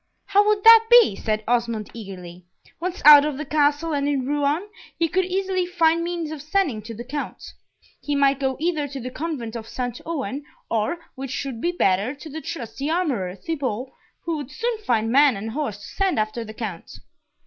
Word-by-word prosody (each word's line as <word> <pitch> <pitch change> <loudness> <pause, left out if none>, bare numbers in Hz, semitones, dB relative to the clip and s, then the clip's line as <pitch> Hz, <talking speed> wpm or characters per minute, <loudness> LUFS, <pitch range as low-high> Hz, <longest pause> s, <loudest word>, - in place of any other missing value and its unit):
"How 410 +1 +3
would 420 -1 +2
that 455 0 +9
be?" 475 - +7
said 215 +1 -2
Osmond, 235 -3 -1
eagerly. 180 -5 -9 0.4
"Once 365 +2 -4
out 295 -1 +11
of 300 -2 -2
the 300 - -4
Castle, 295 +2 +1
and 285 0 0
in 275 -3 0
Rouen, 290 +6 0 0.3
he 335 - +2
could 370 +3 +1
easily 375 -1 -1
find 335 -2 +2
means 340 -2 -3
of 310 -3 -6
sending 310 - 0
to 225 +2 -8
the 235 - -7
Count. 290 +4 -6 0.5
He 290 - -2
might 275 -1 +3
go 265 -1 -1
either 315 -3 0
to 275 0 -7
the 255 0 -6
Convent 260 -7 -5
of 225 -1 -7
St. 245 -1 -4
Ouen, 285 -3 -3 0.3
or, 225 +9 0 0.2
which 270 +1 -5
would 245 -4 -6
be 345 - +1
better, 210 - +1
to 310 +3 -11
the 315 +2 -6
trusty 275 -1 -5
armourer, 270 - -1
Thibault, 260 - -4 0.3
who 335 -2 -2
would 285 -3 -6
soon 460 +9 -2
find 225 - 0
man 275 -3 +5
and 220 +3 -5
horse 265 -6 -3
to 205 - -12
send 385 - -1
after 215 +2 -1
the 220 -1 -10
Count." 200 -8 -6
285 Hz, 195 wpm, -23 LUFS, 230-330 Hz, 0.5 s, out